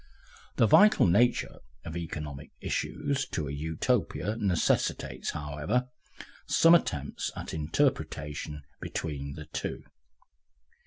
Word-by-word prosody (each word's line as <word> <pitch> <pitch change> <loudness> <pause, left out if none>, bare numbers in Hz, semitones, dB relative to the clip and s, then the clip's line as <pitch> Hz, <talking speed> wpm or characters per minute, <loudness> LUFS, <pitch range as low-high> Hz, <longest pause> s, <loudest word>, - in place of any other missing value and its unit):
The - - +5
vital 210 - +6
nature 115 +7 +2 0.3
of 80 - -6
economic 75 -4 -5
issues 140 -2 -2
to 75 -3 -3
a - - -4
Utopia 80 +7 -1
necessitates, 95 -7 0
however, 75 - -2 0.6
some 165 +1 +6
attempt 75 - +1
at - - -6
interpretation 75 -1 -1 0.2
between 70 -3 -4
the 75 - -8
two. - - -5
80 Hz, 100 wpm, -29 LUFS, 75-110 Hz, 0.6 s, vital